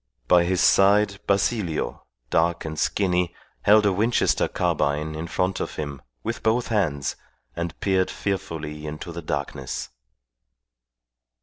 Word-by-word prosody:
By 90 -1 +5
his 90 0 +1
side 100 0 +4
Basilio, 100 -4 0 0.3
dark 85 +1 +2
and 80 -1 -4
skinny, 90 -3 +1 0.3
held 105 +1 +5
a 100 - +3
Winchester 110 +5 +2
carbine 75 +2 0
in 80 +2 -5
front 90 +2 -1
of - - -4
him, 70 -3 -5 0.2
with - - -3
both 115 +2 +1
hands, 80 -11 0 0.4
and 85 -1 -4
peered 95 -2 +2
fearfully 75 -6 -4
into 75 +3 -6
the 85 +1 -6
darkness. 70 -4 -4
85 Hz, 125 wpm, -24 LUFS, 75-100 Hz, 0.4 s, By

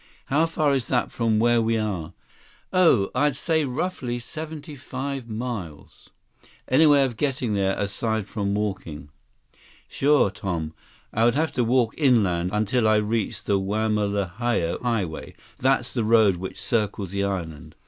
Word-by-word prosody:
"How 160 +3 +4
far 155 -3 +1
is 130 -4 -1
that 125 -2 0
from 115 -2 +1
where 120 +1 +3
we 115 0 +1
are?" 100 -8 -3 0.6
"Oh, 165 - +4
I'd 145 -2 +2
say 160 +1 0
roughly 130 -2 -3
seventy 155 +4 -7
five 135 -1 -5
miles." 110 -9 -6 0.6
"Any 155 +5 +5
way 145 -2 +6
of 120 -4 -5
getting 130 -5 -1
there, 95 -1 0
aside 110 +1 -1
from 100 -1 -2
walking?" 90 -9 -4 0.8
162 - - -14
"Sure, 140 -7 +3
Tom. 85 -5 -4 0.4
I 110 - +1
would 120 +1 +3
have 160 +2 +1
to 125 - +1
walk 120 -1 +2
inland 100 - +3
until 110 +3 +1
I 110 - +4
reached 105 0 -1
the 100 -1 +2
Wamalahoa 105 -1 -1
Highway—that's 120 +4 -2
the 120 - 0
road 110 -4 +4
which 95 +1 -7
circles 105 -5 -1
the 100 0 -1
island. 85 -6 -4
115 Hz, 150 wpm, -24 LUFS, 100-130 Hz, 0.8 s, way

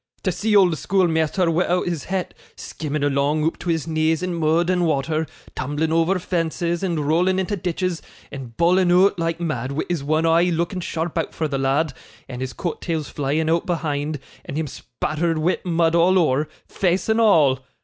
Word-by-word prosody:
To 185 - +1
see 210 +4 0
old 185 -5 +5
schoolmeasther 170 -2 +1
wi'out 180 +2 +1
his 170 -5 -3
hat, 190 -1 -3 0.2
skimming 150 -2 -4
along 145 +2 +1
oop 160 - -1
to 175 - -5
his 165 -3 0
knees 160 +1 0
in 180 -1 -2
mud 165 +1 +1
and 180 -2 +1
wather, 155 +2 0 0.3
tumbling 145 +4 -2
over 165 +4 +2
fences, 170 -1 -2
and 165 -6 -1
rowling 180 +4 +2
into 190 +2 -1
ditches, 180 -1 -2 0.3
and 125 -5 -9
bawling 180 +2 +3
oot 180 +1 +4
like 165 0 -1
mad, 140 -6 -3
wi' 155 - -1
his 170 -5 -1
one 155 +3 +1
eye 165 +1 +4
looking 175 +2 -1
sharp 165 -1 -3
out - - -4
for 160 - -1
the 140 -2 -2
lad, 135 +3 +1 0.3
and 125 -1 -7
his 130 -1 -4
coat 175 - -4
tails 160 -4 -3
flying 145 +3 -1
out 165 +1 +1
behind, 150 -3 -2 0.2
and 140 - -6
him 160 - -1
spattered 155 +3 -3
wi' 160 +4 +1
mud 165 -2 +1
all 175 +3 +4
ower, 150 -3 +2 0.2
face 185 -1 0
and 220 +1 +2
all! 155 - +4
165 Hz, 190 wpm, -22 LUFS, 155-175 Hz, 0.3 s, old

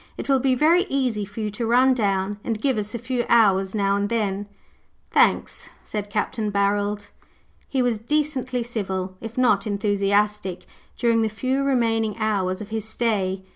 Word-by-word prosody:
It - - -6
will 270 -1 +3
be 260 0 +2
very 330 +7 +4
easy 250 - -1
for 205 +3 -8
you 210 -1 -2
to 225 +3 -3
run 255 +3 +5
down 200 -3 -1
and 225 -3 -2
give 260 -1 +1
us 210 +2 -4
a - - -1
few 245 +1 -2
hours 195 -4 +4
now 200 -1 +2
and 200 0 -1
then." 205 -3 -1 0.6
"Tha - - +2
anks," - - +2
said 210 -1 -5
Capt. 210 +3 -2
Barold. 205 0 0 0.6
He 265 -2 +1
was 240 -3 0
decently 260 -1 -1
civil, 190 -5 -4
if 225 +1 -8
not 215 -5 +3
enthusiastic, 200 -2 0 0.3
during 230 -1 +2
the 220 - +1
few 260 +5 -1
remaining 225 -5 +1
hours 200 -4 -1
of 210 - -8
his 220 -1 -3
stay. 200 -5 -1
215 Hz, 175 wpm, -23 LUFS, 200-245 Hz, 0.6 s, run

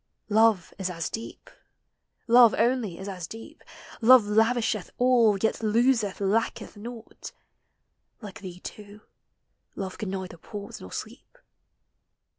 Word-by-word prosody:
Love 220 -4 +3
is 190 -1 -2
as 165 -2 -4
deep, 225 - -8 0.8
love 240 -1 +6
only 230 -6 +1
is 190 - -8
as 180 -4 -6
deep: 225 +8 -11 0.4
Love 250 +1 +8
lavisheth 220 -1 +1
all, 240 -5 +4
yet 220 +3 0
loseth, 225 -1 +2
lacketh 205 +4 -1
naught; 230 +2 -9 0.9
Like 205 -4 -10
thee, 180 -2 -9
too, 210 0 -10 0.7
love 190 -2 -6
can 210 - -3
neither 190 -2 -5
pause 205 +4 -9
nor 90 - -10
sleep. - - -9
215 Hz, 120 wpm, -26 LUFS, 195-230 Hz, 0.9 s, Love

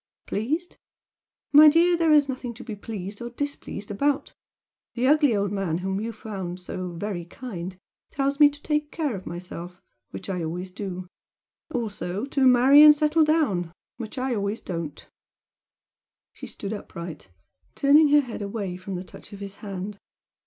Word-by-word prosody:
"Pleased? 305 - -2 0.7
My 300 +1 +9
dear, 340 +3 +5
there 330 -2 +2
is 295 -2 +6
nothing 255 -3 -5
to - - -10
be 220 -3 -6
pleased 205 0 -7
or 235 - -4
displeased 240 -6 -5
about! 280 +7 0 0.6
The 245 +1 0
ugly 290 -4 +4
old 200 -1 0
man 195 -5 -1
whom 190 +2 -2
you 230 +1 -3
found 195 -5 -6
so 180 0 -5
'very 175 0 -4
kind' 185 -3 -7 0.3
tells 280 +1 -1
me 295 -1 +9
to 290 0 -14
take 300 -1 -1
care 300 -8 -2
of 190 - -8
myself 175 0 -7 0.3
which - - -8
I 180 -3 -2
always 180 +3 -4
do. 185 -2 -5 0.7
Also 210 -3 -3
to 275 -1 +2
marry 255 +4 +7
and 300 0 +10
settle 305 +2 +3
down 275 - +1 0.3
which 230 +1 -7
I 255 0 -1
always 205 0 -2
don't!" 165 -5 -6 1.2
She - - -10
stood 200 +1 -6
upright, 170 - -8 0.5
turning 295 +2 +6
her 295 0 +6
head 240 -5 -7
away 200 -3 -4
from 185 +1 -6
the 180 - -4
touch 190 - -13
of 200 - -9
his 200 0 -7
hand. 200 -1 -6
215 Hz, 165 wpm, -25 LUFS, 185-280 Hz, 1.2 s, and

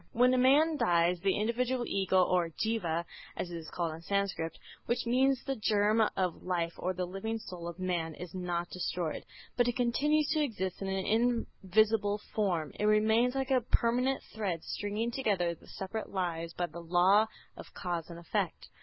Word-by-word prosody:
When 250 +2 +4
a - - +3
man 295 +5 +5
dies 175 -4 +3
the 195 +2 +1
individual 240 +3 0
ego 190 -1 +3
or 180 -2 +1
Jîva 170 -3 -1 0.3
(as 175 - -3
it - - -5
is 165 -1 -7
called 170 -3 -2
in 160 - -9
Sanskrit), 195 -3 -1 0.3
which 240 +1 0
means 260 +2 +2
the 270 - -2
germ 215 -1 +2 0.2
of 185 -3 -1
life 170 -2 -1
or 185 +1 -2
the 180 0 -1
living 195 +5 -3
soul 180 -5 -8
of 170 0 -6
man, 175 -4 -2
is 175 -2 -8
not 175 -2 -3
destroyed, 175 -2 -3 0.3
but 245 -1 +3
it 245 - 0
continues 290 +5 +2
to 310 -1 +2
exist 200 -11 -2
in 195 - -2
an 190 0 -1 0.6
invisible 205 +1 +3 0.2
form. 175 -8 0
It 210 - +1
remains 220 +4 +3
like 270 0 -1
a 255 -1 +4
permanent 250 +3 +1
thread 190 -7 -2
stringing 210 +3 -2
together 200 -9 0
the 165 - -17
separate 205 +3 -5
lives 170 -3 -2
by 175 - 0
the 170 +1 -9
law 180 +5 +4 0.3
of - - -11
cause 175 -3 -3
and 170 - -8
effect. 170 -1 -3
195 Hz, 180 wpm, -31 LUFS, 175-235 Hz, 0.6 s, man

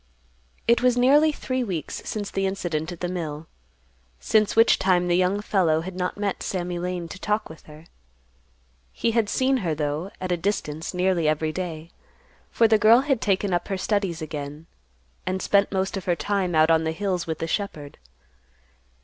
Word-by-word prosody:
It 235 +1 +4
was 250 -1 +3
nearly 290 +5 +5
three 255 -3 -2
weeks 180 -9 -4
since 205 -2 -4
the 195 0 0
incident 175 -4 -3
at 175 - -9
the 180 - -1
mill, 165 -4 -4 0.7
since 215 -1 +2
which 225 +1 +5
time 180 -2 +2
the 175 - +2
young 185 +3 +1
fellow 170 -7 +2
had 185 +2 -7
not 180 +1 -2
met 205 -2 -2
Sammy 180 -2 -3
Lane 180 -1 -3
to 185 - -9
talk 210 +2 -1
with 160 - -13
her. 155 +1 -13 1.1
He 230 - -1
had 225 -2 +1
seen 265 +1 +2
her, 170 -9 -1
though, 150 +4 -2
at 185 -1 -3
a 175 - +1
distance 165 -3 -3
nearly 180 -3 +1
every 155 +1 +1
day, 165 -1 -5 0.6
for 230 - +3
the 220 -1 +4
girl 225 +4 +6
had 270 -4 0
taken 195 -1 +1
up 175 0 -1
her 195 - -2
studies 190 -5 -1
again, 150 0 -6 0.6
and 185 0 -1
spent 200 +1 +2
most 190 0 -1
of 195 - -5
her 175 - +2
time 190 -1 -1
out 155 +1 +5
on 160 0 +3
the 160 0 -1
hills 180 -1 -2
with 160 -1 -2
the 165 - -3
shepherd. 160 -6 -4
185 Hz, 185 wpm, -24 LUFS, 165-205 Hz, 1.1 s, girl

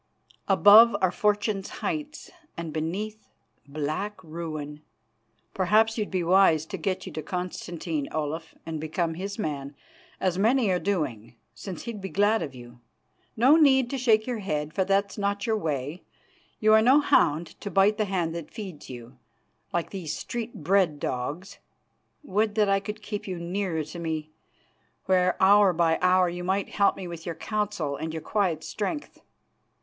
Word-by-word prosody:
Above 205 +3 +7
are 185 -2 +2
Fortune's 205 0 0 0.2
heights, 300 -1 -4 0.3
and 165 -2 -5
beneath 200 +8 -4 0.4
black 155 +8 -3
ruin. 155 -2 -6 0.7
Perhaps 215 +4 +3
you'd 215 -3 -2
be 185 -2 -1
wise 170 -3 +4
to 175 - -6
get 185 +1 -2
you 185 - -7
to 155 - -5
Constantine, 175 -3 -4
Olaf, 155 +2 -4
and 160 -1 -4
become 165 +1 -1
his 195 +4 -5
man, 145 -7 -4 0.4
as 185 -1 0
many 225 0 +3
are 180 - +1
doing, 140 - -2 0.2
since 190 -3 -8
he'd 230 -4 -6
be 195 - -5
glad 205 +3 +2
of 135 -3 -5
you. 120 0 -12 0.6
No 260 +7 +6
need 265 -5 +4
to 275 - -2
shake 220 -3 +3
your 245 -3 -3
head, 155 -6 -3
for 190 - +1
that's 195 +2 0
not 200 0 -1
your 225 - +1
way; 150 -3 -3 0.6
you 215 0 +4
are 220 - +7
no 260 +6 +6
hound 165 - +2
to 205 - -4
bite 200 +2 +3
the 215 - +2
hand 180 -4 -1
that 170 -2 -6
feeds 190 -9 -9
you, 120 0 -10 0.5
like 170 -1 -2
these 180 -6 -4
street 230 -6 -6
bred 180 -4 +2
dogs. 170 +12 -4 0.6
Would 210 -4 0
that 210 -2 +3
I 195 0 +3
could 210 +1 -7
keep 210 -1 -5
you 185 -2 -4
nearer 170 -1 -2
to 155 +4 -9
me, 160 -2 -4 0.7
where 185 -1 +2
hour 200 0 +6
by 165 -1 +2
hour 185 0 +4
you 175 +1 -5
might 190 +2 -1
help 200 -1 +2
me 185 - -6
with 170 -1 -8
your 170 - -3
counsel 200 -7 -2
and 160 +2 -4
your 160 -1 -6
quiet 180 -7 0
strength. 290 +8 -4
185 Hz, 165 wpm, -26 LUFS, 160-210 Hz, 0.7 s, Above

